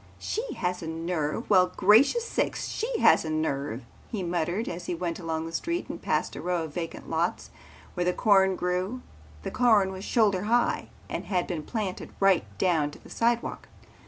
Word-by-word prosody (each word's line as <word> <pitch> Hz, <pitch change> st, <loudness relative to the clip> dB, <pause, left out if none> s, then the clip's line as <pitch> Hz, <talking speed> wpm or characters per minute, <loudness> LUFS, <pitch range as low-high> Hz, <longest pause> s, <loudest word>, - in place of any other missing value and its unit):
"She 455 Hz, 0 st, -3 dB
has 180 Hz, 0 st, -2 dB
a 165 Hz, -, -5 dB
nerve! 165 Hz, +3 st, -2 dB
Well, 185 Hz, -2 st, +5 dB
gracious 245 Hz, -, +5 dB
sakes, -, -, -1 dB
she 460 Hz, +1 st, -2 dB
has -, -, +6 dB
a 160 Hz, -, -4 dB
nerve," 140 Hz, -5 st, -2 dB, 0.3 s
he 210 Hz, -5 st, -2 dB
muttered 175 Hz, +5 st, -1 dB
as 175 Hz, +1 st, -5 dB
he 175 Hz, -, -1 dB
went 170 Hz, 0 st, -3 dB
along 160 Hz, -2 st, -3 dB
the 165 Hz, -, -6 dB
street 340 Hz, -, -2 dB
and -, -, -6 dB
passed -, -, -1 dB
a -, -, -6 dB
row 180 Hz, -2 st, -1 dB
of 155 Hz, -2 st, -7 dB
vacant 165 Hz, 0 st, -5 dB
lots -, -, -1 dB, 0.4 s
where 180 Hz, 0 st, +1 dB
corn 190 Hz, -1 st, +4 dB
grew. 185 Hz, +8 st, -2 dB, 0.4 s
The -, -, -4 dB
corn 220 Hz, -6 st, +4 dB
was 190 Hz, 0 st, -7 dB
shoulder 205 Hz, -5 st, +2 dB
high 240 Hz, +2 st, +1 dB, 0.2 s
and -, -, -4 dB
had 180 Hz, -3 st, 0 dB
been 170 Hz, -4 st, -3 dB
planted 195 Hz, +3 st, -4 dB
right 195 Hz, -, +4 dB
down 160 Hz, -5 st, +2 dB
to -, -, -12 dB
the -, -, -14 dB
sidewalk. 235 Hz, 0 st, 0 dB
180 Hz, 185 wpm, -27 LUFS, 165-215 Hz, 0.4 s, has